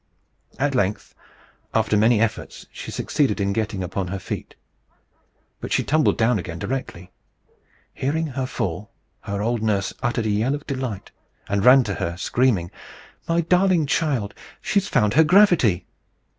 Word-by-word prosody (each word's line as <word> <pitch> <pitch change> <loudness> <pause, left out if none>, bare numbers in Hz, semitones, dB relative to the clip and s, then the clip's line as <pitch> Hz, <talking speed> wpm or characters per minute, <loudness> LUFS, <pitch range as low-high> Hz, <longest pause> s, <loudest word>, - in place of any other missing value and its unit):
At 140 +1 0
length, 105 -4 -1 0.6
after 110 -1 +2
many 110 +2 +4
efforts, 115 0 -2
she - - -8
succeeded 140 -7 0
in 100 0 0
getting 105 -3 -2
upon 90 +1 -3
her 100 +3 -4
feet. 95 - -7 1.0
But - - -7
she - - +2
tumbled 155 0 +2
down 115 -1 +2
again 85 -2 -6
directly. 95 -6 -5 0.8
Hearing 155 +5 -1
her 130 -3 -3
fall, 95 -1 -4 0.3
her 100 -1 -4
old 115 0 -1
nurse 100 -3 0
uttered 120 -2 -1
a 110 - +1
yell 115 +7 +1
of 145 - -9
delight, 130 -7 -5 0.4
and 100 -1 0
ran 130 +2 +7
to 105 -3 -3
her, 85 -1 -3
screaming, 100 -4 +1 0.6
"My 165 +1 +2
darling 180 -1 +3
child! 135 -9 0 0.3
she's 200 -1 0
found 105 - +2
her 160 +5 +6
gravity!" 160 - +4
115 Hz, 150 wpm, -22 LUFS, 100-140 Hz, 1.0 s, ran